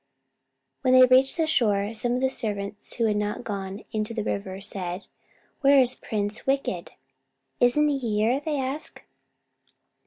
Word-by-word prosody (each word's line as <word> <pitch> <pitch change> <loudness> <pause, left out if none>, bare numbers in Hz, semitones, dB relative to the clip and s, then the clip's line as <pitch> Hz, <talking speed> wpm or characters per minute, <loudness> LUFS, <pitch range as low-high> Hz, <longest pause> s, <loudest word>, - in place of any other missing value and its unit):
When 255 -2 +3
they 255 0 +9
reached 260 +3 +4
the 325 - +2
shore, 210 -8 +1
some 240 +2 0
of 250 - -1
the 265 - +2
servants 205 -4 -3
who 230 - 0
had 210 -1 +1
not 210 +3 -2
gone 195 -1 -5
into 215 +1 -2
the 220 - -2
river 195 -2 -4
said, 190 -2 -5 0.5
"Where 280 -1 +5
is 255 -1 +3
Prince 210 0 -4
Wicked?" 275 0 -1 0.7
"Isn't 245 +5 +4
he 285 -2 0
here?" 225 +1 +1
they 300 -2 -1
asked. 270 +3 -4
230 Hz, 155 wpm, -25 LUFS, 205-265 Hz, 0.7 s, they